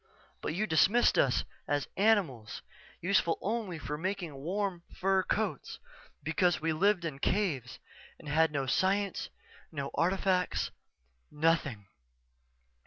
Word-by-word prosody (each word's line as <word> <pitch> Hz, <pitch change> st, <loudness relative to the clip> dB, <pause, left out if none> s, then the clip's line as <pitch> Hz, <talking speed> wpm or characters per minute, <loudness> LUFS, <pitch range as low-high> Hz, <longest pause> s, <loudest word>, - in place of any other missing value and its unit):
But 155 Hz, -, -3 dB
you 210 Hz, +4 st, +1 dB
dismissed 200 Hz, +7 st, +4 dB
us 130 Hz, -, +3 dB, 0.2 s
as 145 Hz, -1 st, 0 dB
animals, 190 Hz, -, +1 dB, 0.4 s
useful 175 Hz, -2 st, +2 dB
only 210 Hz, -4 st, -2 dB
for 150 Hz, -1 st, -5 dB
making 185 Hz, -3 st, -3 dB
warm 180 Hz, +6 st, -2 dB
fur 190 Hz, 0 st, +2 dB
coats, 195 Hz, -, -2 dB, 0.5 s
because 165 Hz, +3 st, +2 dB
we 160 Hz, 0 st, 0 dB
lived 185 Hz, +2 st, +2 dB
in 145 Hz, -4 st, -4 dB
caves 140 Hz, -, 0 dB, 0.4 s
and 160 Hz, -, -13 dB
had 160 Hz, +2 st, +3 dB
no 140 Hz, -2 st, -1 dB
science, 190 Hz, +7 st, +1 dB, 0.4 s
no 140 Hz, -3 st, -4 dB
artifacts 185 Hz, 0 st, +1 dB, 0.6 s
nothing. 150 Hz, -8 st, +1 dB
170 Hz, 115 wpm, -31 LUFS, 150-195 Hz, 0.6 s, dismissed